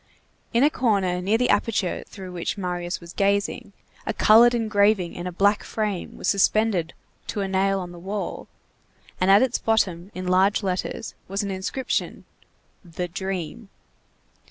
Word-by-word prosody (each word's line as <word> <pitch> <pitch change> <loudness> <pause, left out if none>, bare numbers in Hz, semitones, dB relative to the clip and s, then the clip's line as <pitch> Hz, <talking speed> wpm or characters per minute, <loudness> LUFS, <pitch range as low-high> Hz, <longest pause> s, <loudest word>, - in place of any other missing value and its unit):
In 235 +3 +3
a 295 - +5
corner 195 -9 +1
near 205 +5 +2
the 250 +1 +2
aperture 205 -3 0
through 190 -2 -9
which 175 +3 -3
Marius 180 -2 -3
was 170 0 -12
gazing, 200 0 0 0.4
a 220 - -1
colored 235 +3 +6
engraving 210 -5 +2
in 175 +1 -5
a - - -3
black 200 +4 +2
frame 210 -5 -3
was - - -4
suspended 200 -3 +2 0.3
to 210 - -3
a 195 - -1
nail 195 +1 +1
on 180 -1 -6
the 175 - -11
wall, 195 +3 -5 0.7
and 185 - +2
at 200 +5 +7
its 255 -2 0
bottom, 190 -5 0
in 185 0 -5
large 190 +4 +3
letters, 185 -1 -3
was 195 +1 -2
the 200 -1 -3
inscription: 190 +7 -3 0.6
THE 175 0 -5
DREAM. 190 +3 -5
195 Hz, 155 wpm, -24 LUFS, 180-215 Hz, 0.7 s, at